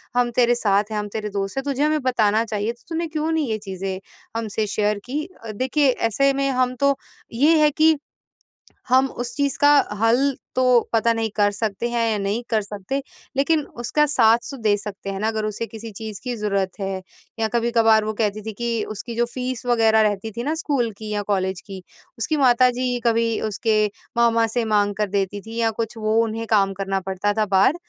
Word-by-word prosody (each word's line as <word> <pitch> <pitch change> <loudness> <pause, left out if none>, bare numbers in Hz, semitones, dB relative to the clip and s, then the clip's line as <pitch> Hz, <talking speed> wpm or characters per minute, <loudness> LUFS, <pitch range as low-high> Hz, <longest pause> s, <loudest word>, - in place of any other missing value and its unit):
हम 245 -1 +3
तेरे 240 -1 +4
साथ 205 -3 +2
हैं, 215 - -2
हम 210 - -3
तेरे 215 -1 -3
दोस्त 195 +4 -3
हैं, 270 - 0
तुझे 280 0 -1
हमें 305 0 +2
बताना 225 -3 +2
चाहिए 215 +1 -2
तो 235 - -27
तूने 330 0 -2
क्यों 315 +1 -2
नहीं 315 -3 0
ये 215 - 0
चीज़ें 190 -2 -5 0.4
हमसे 220 -1 -2
शेयर 210 0 0
की? 300 +6 -3 0.3
देखिए 265 +4 +2 0.2
ऐसे 275 +5 +3
में 275 0 0
हम 255 0 +1
तो 280 0 +4 0.4
ये 305 +6 +4
है 300 - +6
कि 315 +2 +4 0.9
हम 260 +1 +5
उस 240 -1 -6
चीज़ 280 -1 0
का 290 - +6 0.3
हल 225 +2 +4 0.4
तो 255 - +2 0.3
पता 230 +1 +3
नहीं 225 -1 -1
कर 205 -1 +3
सकते 220 +2 -2
हैं 235 -1 0
या 210 - 0
नहीं 200 +4 -1
कर 220 -2 +2
सकते? 205 +7 -4 0.4
लेकिन 305 +2 +3 0.2
उसका 300 +5 +2
साथ 235 -2 +3
दे 210 -2 +3
सकते 200 -1 -7
हैं 195 0 -4
ना 215 - 0
अगर 220 -1 -1
उसे 215 +2 -3
किसी 225 0 -9
चीज़ 215 0 -7
की 250 -2 -3
ज़रूरत 200 -3 -1
है 195 -1 -3 0.4
या 220 - +2
कभी-कभार 230 -2 +3
वो 215 - -2
कहती 215 -1 -1
थी 220 +1 -6
कि 230 0 -2
उसकी 225 +3 -6
जो 240 - +2
फीस 255 -1 -4
वग़ैरह 225 -2 +4
रहती 210 +1 0
थी 235 +3 -5
ना 300 - 0
स्कूल 270 -8 -1
की 215 0 -7
या 205 0 -1
कॉलेज 190 -2 -1
की, 195 -2 -9 0.4
उसकी 305 +6 -1
माता 255 -2 +5
जी 245 0 -1
कभी 230 -1 +2
उसके 215 +1 +1 0.3
मामा 230 -1 +4
से 230 +1 -1
माँग 205 -1 +2
कर 210 -2 0
देती 200 0 -1
थी 225 +1 -8
या 225 -1 +2
कुछ 230 +1 -5
वो 215 0 0
उन्हें 225 0 -3
काम 195 -3 +3
करना 195 0 -2
पड़ता 190 +2 -1
था 215 - +3
बाहर 195 - +3
225 Hz, 205 wpm, -22 LUFS, 205-250 Hz, 0.9 s, है